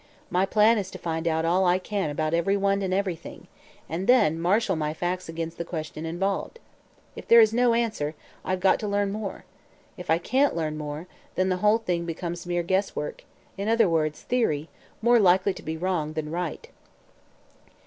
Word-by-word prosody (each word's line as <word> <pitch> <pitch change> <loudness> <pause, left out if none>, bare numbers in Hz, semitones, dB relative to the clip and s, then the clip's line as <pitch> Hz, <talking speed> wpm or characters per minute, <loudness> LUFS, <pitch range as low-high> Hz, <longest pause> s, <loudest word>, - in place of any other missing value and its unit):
My 185 +2 +2
plan 215 +2 +4
is 190 -2 -4
to - - -8
find 165 0 -3
out 160 0 +1
all 180 +3 +3
I 180 0 +4
can 190 -2 -2
about 155 +2 -1
everyone 195 +3 +1
and 190 -1 -2
everything, 185 -3 -3 0.4
and 170 +5 -4
then 210 -11 +4
marshal 190 +3 +2
my 155 -1 -2
facts 180 0 -3
against 165 0 -5
the - - -1
question 160 -1 -5
involved. 195 - -2 0.6
If - - -9
there 235 - +8
is 220 -1 +6
no 240 0 +3
answer, 215 -11 -1 0.3
I've 185 0 -2
got 190 - +4
to 210 - -3
learn 200 0 0
more. 205 -2 -5 0.5
If 180 - -9
I 160 - +4
can't 265 +11 +1
learn 155 -2 -2
more, 150 +2 -5 0.3
then 185 0 +1
the 185 - +1
whole 210 +4 +4
thing 175 -6 -2
becomes 170 +1 -5
mere 175 0 0
guesswork 190 -4 -2 0.4
in 200 - -2
other 225 -2 +4
words, 155 -2 0
theory 165 -12 0 0.3
more 240 +1 +5
likely 190 0 +4
to - - -10
be 160 +1 -4
wrong 165 -3 -1
than 155 -1 -4
right." 170 -1 -4
180 Hz, 185 wpm, -26 LUFS, 165-200 Hz, 0.6 s, there